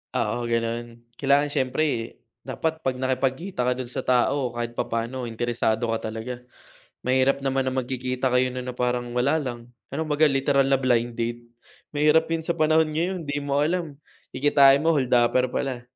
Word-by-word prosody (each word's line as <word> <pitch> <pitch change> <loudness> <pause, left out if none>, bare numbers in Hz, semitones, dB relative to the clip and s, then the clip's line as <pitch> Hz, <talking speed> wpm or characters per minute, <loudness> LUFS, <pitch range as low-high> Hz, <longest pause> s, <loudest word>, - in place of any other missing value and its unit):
Oo, 120 -1 -1
gano'n. 115 0 -3 0.2
Kailangan 140 +1 +3
siyempre, 130 -3 -1 0.2
dapat 160 0 -3
'pag 130 -1 -1
nakipagkita 130 +5 -1
ka 125 0 +1
do'n 125 -1 -6
sa - - -2
tao 130 +1 +1
kahit 120 0 -3
papaano 120 +1 -3
interesado 120 0 -1
ka 110 -1 -3
talaga. 115 +3 -6 0.6
Mahirap 130 +2 +2
naman 135 -1 0
ng 130 0 0
magkikita 130 +1 -2
kayo 125 0 +2
no'n 125 0 -5
na 125 - -6
parang 125 -1 -1
wala 140 +6 +2
lang 120 -3 -7 0.2
pero 155 +4 -3
kumbaga 155 0 +3
literal 135 0 +2
na 135 - +5
blind 120 -2 +1
date, 120 0 -3 0.5
mahirap 150 +2 +4
'yun 165 -1 -1
sa 170 - +1
panahon 160 0 +3
ngayon 175 +2 -2
'di 145 0 -2
mo 140 0 0
alam 165 -3 -2 0.3
kikitain 140 -1 +5
mo 165 - +4
holdaper 125 -1 +2
pala. 125 -2 -3
130 Hz, 165 wpm, -24 LUFS, 120-145 Hz, 0.6 s, na